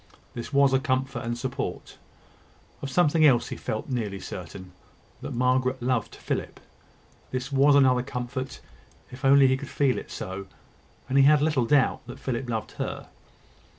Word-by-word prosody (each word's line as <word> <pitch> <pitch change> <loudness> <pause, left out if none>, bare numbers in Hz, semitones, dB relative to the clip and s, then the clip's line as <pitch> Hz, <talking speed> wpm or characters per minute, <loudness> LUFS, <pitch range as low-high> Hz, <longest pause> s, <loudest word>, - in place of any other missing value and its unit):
This 120 +2 -6
was 140 -1 +4
a 130 - +4
comfort 130 -2 -1
and 120 0 -3
support. 130 +1 -5 0.8
Of 140 - -4
something 155 +2 +3
else 130 -6 +4
he - - -4
felt 110 - -4
nearly 110 -7 -3
certain 90 0 -8 0.5
that - - -6
Margaret 130 +1 +1
loved 120 -3 -1
Philip. - - -4 0.7
This 130 +2 -4
was 140 +1 +5
another 130 -3 +5
comfort, 130 +1 -5 0.5
if 130 - -10
he 135 - +2
could 135 - +7
only 135 -2 +5
feel 140 -1 0
it - - -11
so; 95 +1 -6 0.6
and 135 +1 +2
he 135 - +7
had 150 +1 +6
little 150 -6 +2
doubt 140 +2 +2
that 120 - -8
Philip 125 -1 -4
loved 110 -3 -3
her. - - -5
130 Hz, 160 wpm, -26 LUFS, 120-140 Hz, 0.8 s, could